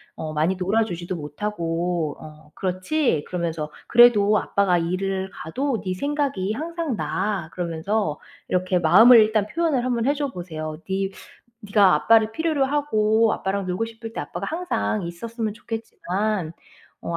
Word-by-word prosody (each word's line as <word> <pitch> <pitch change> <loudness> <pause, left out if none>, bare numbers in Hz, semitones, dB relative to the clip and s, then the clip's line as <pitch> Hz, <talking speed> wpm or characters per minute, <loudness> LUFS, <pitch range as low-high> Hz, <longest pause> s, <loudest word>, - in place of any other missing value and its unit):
어 155 -1 -5
많이 160 +5 +1
놀아주지도 185 -2 -1
못하고 170 -1 -3
어 155 -1 -13
그렇지?" 185 - -1
그러면서 165 -4 -3 0.2
"그래도 215 -3 +6
아빠가 195 -3 +1
일을 190 +3 -2
가도 255 - -3
네 185 -2 -3
생각이 280 -5 -1
항상 325 +1 -3
나." 190 -6 -2
그러면서 170 0 -2 0.3
이렇게 185 0 +1
마음을 220 +9 +8
일단 215 -1 +3
표현을 310 -2 0
한번 240 -2 0
해줘 285 +1 +1
보세요. 155 -4 -6
"네 195 0 -1 0.5
네가 200 -3 +4
아빠를 220 -1 +4
필요로 315 -1 0
하고 225 -6 +2
아빠랑 195 0 -2
놀고 185 +5 -1
싶을 225 0 -9
때 - - -3
아빠가 175 +6 -5
항상 205 - -2
있었으면 220 +6 -4
좋겠지만 215 -5 -3 0.5
어 170 - -3
200 Hz, 320 characters per minute, -23 LUFS, 175-230 Hz, 0.5 s, 마음을